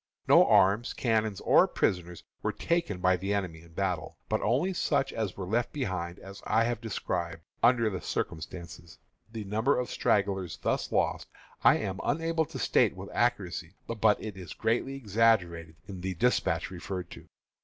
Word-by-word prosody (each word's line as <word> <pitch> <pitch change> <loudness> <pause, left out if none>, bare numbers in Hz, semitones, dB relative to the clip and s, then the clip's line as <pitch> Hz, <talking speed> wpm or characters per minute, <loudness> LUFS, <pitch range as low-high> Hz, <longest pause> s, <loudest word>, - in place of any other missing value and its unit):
No - - +7
arms, 100 +5 +4
cannon, 110 -3 +1
or - - +6
prisoners 90 -2 -1 0.2
were - - 0
taken 170 - -1
by 90 0 +3
the 100 +3 -1
enemy 90 -5 -3
in 85 0 -18
battle, 90 -4 -2
but - - 0
only 140 - +1
such 140 -5 0
as 110 -5 -3
were 95 - -4
left 115 +6 0
behind, 95 -10 -3
as 95 +1 -11
I 110 +1 +3
have 120 -1 -1
described, 85 -7 -3 0.2
under 120 -1 +4
the 95 -4 -3
circumstances. 85 0 -5 0.3
The 110 -2 -5
number 110 +7 +1
of 125 - -3
stragglers 95 -4 0
thus - - -1
lost - - 0 0.4
I - - +7
am 95 -2 -4
unable 165 +1 0
to - - -8
state - - +2
with - - -8
accuracy, - - -1
but 110 -2 +2
it 105 -3 -7
is 90 -4 -8
greatly 120 +4 0
exaggerated 100 - +1
in 95 -2 -7
the 95 0 -3
despatch 125 0 +1
referred 90 0 -6
to. - - -11
100 Hz, 165 wpm, -29 LUFS, 90-115 Hz, 0.4 s, No